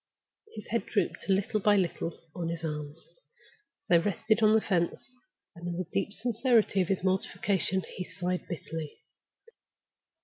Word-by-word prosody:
His -, -, -7 dB
head -, -, -1 dB
drooped -, -, -1 dB
little 195 Hz, +2 st, +2 dB
by 205 Hz, +1 st, +4 dB
little 170 Hz, -3 st, -1 dB, 0.2 s
on 170 Hz, -2 st, -2 dB
his 170 Hz, 0 st, -4 dB
arms, 150 Hz, -1 st, -4 dB, 0.9 s
as -, -, -21 dB
they 170 Hz, -, +6 dB
rested 215 Hz, +5 st, +1 dB
on 215 Hz, 0 st, +6 dB
the -, -, +6 dB
fence, 185 Hz, +5 st, -1 dB, 0.4 s
and, 170 Hz, 0 st, -7 dB
in 170 Hz, -1 st, -3 dB
the 185 Hz, -, -2 dB
deep 200 Hz, +1 st, 0 dB
sincerity 230 Hz, -2 st, +2 dB
of 180 Hz, -, 0 dB
his 190 Hz, -2 st, 0 dB
mortification, 190 Hz, 0 st, +1 dB
he 185 Hz, -, -3 dB
sighed 180 Hz, 0 st, -3 dB
bitterly. 160 Hz, -2 st, -6 dB
185 Hz, 150 wpm, -30 LUFS, 170-205 Hz, 0.9 s, they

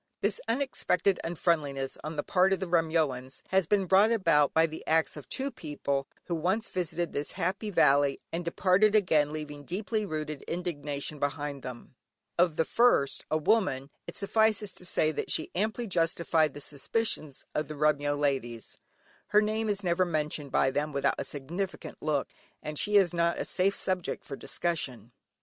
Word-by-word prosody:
This -, -, 0 dB
unexpected 215 Hz, -8 st, +1 dB
unfriendliness 150 Hz, -5 st, 0 dB
on 155 Hz, +1 st, -5 dB
the 145 Hz, -, -1 dB
part 190 Hz, 0 st, +3 dB
of 195 Hz, -, -1 dB
the 190 Hz, -, -2 dB
Remyoans 160 Hz, -7 st, 0 dB
has 190 Hz, -3 st, +2 dB
been 200 Hz, 0 st, +2 dB
brought 195 Hz, +5 st, +5 dB
about 165 Hz, -10 st, +3 dB
by 160 Hz, 0 st, +4 dB
the 160 Hz, -1 st, -7 dB
acts 160 Hz, 0 st, +2 dB
of 150 Hz, -, -10 dB
two 275 Hz, +1 st, -2 dB
people, 140 Hz, -, -3 dB, 0.2 s
who 175 Hz, -, -4 dB
once 185 Hz, +7 st, 0 dB
visited 175 Hz, -2 st, -2 dB
this 145 Hz, +1 st, -3 dB
happy 190 Hz, +4 st, -2 dB
valley, 140 Hz, -6 st, +4 dB
and 170 Hz, +1 st, -2 dB
departed 190 Hz, +5 st, +3 dB
again 155 Hz, -8 st, +3 dB
leaving 150 Hz, -2 st, -6 dB
deeply 210 Hz, -, -2 dB
rooted 155 Hz, -5 st, -4 dB
indignation 150 Hz, -4 st, -4 dB
behind 145 Hz, -1 st, -2 dB
them. 125 Hz, -1 st, -9 dB, 0.5 s
Of 170 Hz, -3 st, +4 dB
the 160 Hz, -, +1 dB
first, 230 Hz, -, +3 dB
a 155 Hz, -, +2 dB
woman, 150 Hz, -7 st, +1 dB, 0.2 s
it -, -, -6 dB
suffices 215 Hz, -1 st, +2 dB
to 180 Hz, -, -8 dB
say 155 Hz, -3 st, +2 dB
that 155 Hz, -, -4 dB
she 155 Hz, -, 0 dB
amply 215 Hz, +5 st, -1 dB
justified 165 Hz, -4 st, +1 dB
the 145 Hz, -, -7 dB
suspicions 150 Hz, -, -3 dB
of 155 Hz, -, -1 dB
the 155 Hz, -, -6 dB
Remyo 145 Hz, -1 st, +2 dB
ladies. 130 Hz, -5 st, -2 dB, 0.5 s
Her 210 Hz, -, +5 dB
name 215 Hz, +1 st, -1 dB
is 205 Hz, -1 st, -1 dB
never 175 Hz, 0 st, +2 dB
mentioned 150 Hz, -4 st, -2 dB
by 135 Hz, -, +3 dB
them 150 Hz, +2 st, -1 dB
without 140 Hz, 0 st, +1 dB
a -, -, -1 dB
significant 165 Hz, +4 st, -5 dB
look, 150 Hz, -3 st, 0 dB, 0.4 s
and 150 Hz, -1 st, -3 dB
she 210 Hz, 0 st, +1 dB
is 185 Hz, -3 st, +4 dB
not 170 Hz, 0 st, +1 dB
a -, -, -2 dB
safe 195 Hz, +2 st, +2 dB
subject 185 Hz, -2 st, -2 dB
for 140 Hz, -, -6 dB
discussion. 130 Hz, -10 st, -2 dB
165 Hz, 170 wpm, -29 LUFS, 145-190 Hz, 0.5 s, brought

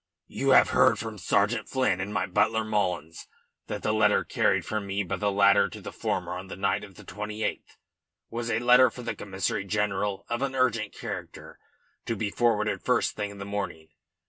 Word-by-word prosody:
"You -, -, -1 dB
have -, -, +6 dB
heard -, -, +4 dB
from 110 Hz, -2 st, -6 dB
Sergeant 105 Hz, +5 st, +1 dB
Flynn 130 Hz, -9 st, +1 dB
and 100 Hz, +2 st, -4 dB
my 100 Hz, -3 st, 0 dB
butler 110 Hz, +4 st, +1 dB
Mullins 90 Hz, -7 st, -2 dB, 0.4 s
that -, -, -5 dB
the 110 Hz, -, +1 dB
letter 110 Hz, -1 st, +3 dB
carried -, -, +1 dB
from 105 Hz, -2 st, -3 dB
me 100 Hz, +1 st, -1 dB
by 90 Hz, -, -3 dB
the 105 Hz, -1 st, 0 dB
latter 100 Hz, 0 st, +4 dB
to -, -, -9 dB
the -, -, -8 dB
former -, -, -2 dB
on 90 Hz, +1 st, -6 dB
the -, -, -7 dB
night 100 Hz, +2 st, 0 dB
of 100 Hz, -3 st, -12 dB
the -, -, -13 dB
28th 105 Hz, +1 st, -5 dB, 0.5 s
was 115 Hz, 0 st, -3 dB
a 110 Hz, -, +1 dB
letter 125 Hz, +2 st, +6 dB
for 125 Hz, +2 st, -10 dB
the 115 Hz, -1 st, -2 dB
Commissary 100 Hz, 0 st, -3 dB
General 100 Hz, -1 st, -1 dB
of 120 Hz, +1 st, -2 dB
an 135 Hz, -1 st, -1 dB
urgent 115 Hz, -5 st, +1 dB
character, -, -, -8 dB, 0.5 s
to 115 Hz, -, -1 dB
be 105 Hz, -1 st, -2 dB
forwarded 110 Hz, -2 st, +1 dB
first 125 Hz, -2 st, +1 dB
thing 105 Hz, -1 st, -3 dB
in 100 Hz, -, -11 dB
the 100 Hz, -, -6 dB
morning. 100 Hz, -6 st, -5 dB
105 Hz, 195 wpm, -27 LUFS, 100-115 Hz, 0.5 s, have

